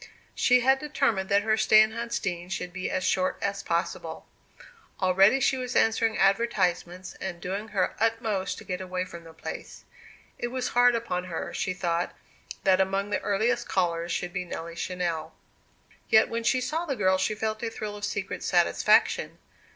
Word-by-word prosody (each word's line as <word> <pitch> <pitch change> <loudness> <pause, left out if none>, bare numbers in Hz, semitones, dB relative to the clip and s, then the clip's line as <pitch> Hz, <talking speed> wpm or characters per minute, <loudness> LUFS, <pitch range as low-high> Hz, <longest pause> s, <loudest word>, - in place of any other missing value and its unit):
She 250 0 +4
had 265 +2 +4
determined 275 -10 0
that 200 0 +3
her 220 0 +2
stay 215 0 +5
in 215 0 +5
Huntsdean 200 -6 -3
should 180 -2 -4
be 185 0 -3
as 185 - -1
short 185 0 +1
as 200 0 -2
possible. 170 +1 -3 0.7
Already 195 +7 +4
she 265 0 +2
was 250 -1 -4
answering 225 0 +2
advertisements, 185 -4 +1
and 185 -3 -4
doing 195 +5 -4
her 195 -4 0
utmost 225 -3 0
to - - -10
get 180 -1 -4
away 185 0 -3
from 170 -2 -11
the 165 - -11
place. 160 - -8 0.6
It - - -1
was 250 +1 -3
hard 245 0 +4
upon 180 -6 -2
her, 170 -3 -5
she 185 - -2
thought, 170 -1 -1 0.5
that 190 -1 +4
among 195 +2 -1
the 195 - 0
earliest 220 +4 0
callers 170 -2 0
should 175 0 -3
be 185 -1 -2
Nelly 170 -1 -6
Channell. 170 -2 -3 0.8
Yet 220 - +5
when 230 0 -3
she 255 +2 +2
saw 320 +6 -2
the 275 - -1
girl 190 -4 +2
she 210 +3 0
felt 215 0 -3
a 230 - -2
thrill 215 -2 -6
of 205 - -10
secret 200 -1 -3
satisfaction. - - +2
195 Hz, 175 wpm, -27 LUFS, 180-225 Hz, 0.8 s, stay